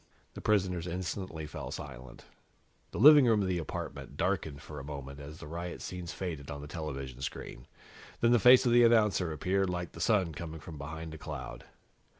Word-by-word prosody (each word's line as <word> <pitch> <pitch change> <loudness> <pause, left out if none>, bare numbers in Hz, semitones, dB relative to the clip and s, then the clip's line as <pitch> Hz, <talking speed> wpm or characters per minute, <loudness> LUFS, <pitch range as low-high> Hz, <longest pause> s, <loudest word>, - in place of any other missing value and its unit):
The - - -8
prisoners 90 -5 +1
instantly 90 -2 -4
fell - - -7
silent. 65 0 -9 0.6
The - - -7
living 145 +1 +9
room 110 -3 +4
of - - -1
the 90 -1 0
apartment 80 - -6
darkened 70 -3 -1
for 75 -1 -8
a - - -7
moment 70 -1 -7
as 75 +2 -9
the - - -10
riot 85 +3 -5
scenes 90 -2 -6
faded 80 -7 -5
on 70 0 -6
the 75 - -8
television 70 -5 -6
screen, 65 - -5
and - - -17 0.5
then 115 - +4
the 120 - +6
face 125 +5 +8
of 120 - +3
the 120 0 +7
announcer 105 -7 +4
appeared, 95 +5 0
like 90 -1 -3
the 85 - -9
Sun 95 -4 +2
coming 80 +1 -6
from 75 0 -9
behind 80 +2 -6
a 80 - -9
cloud. 65 -3 -7
85 Hz, 195 wpm, -31 LUFS, 75-95 Hz, 0.6 s, living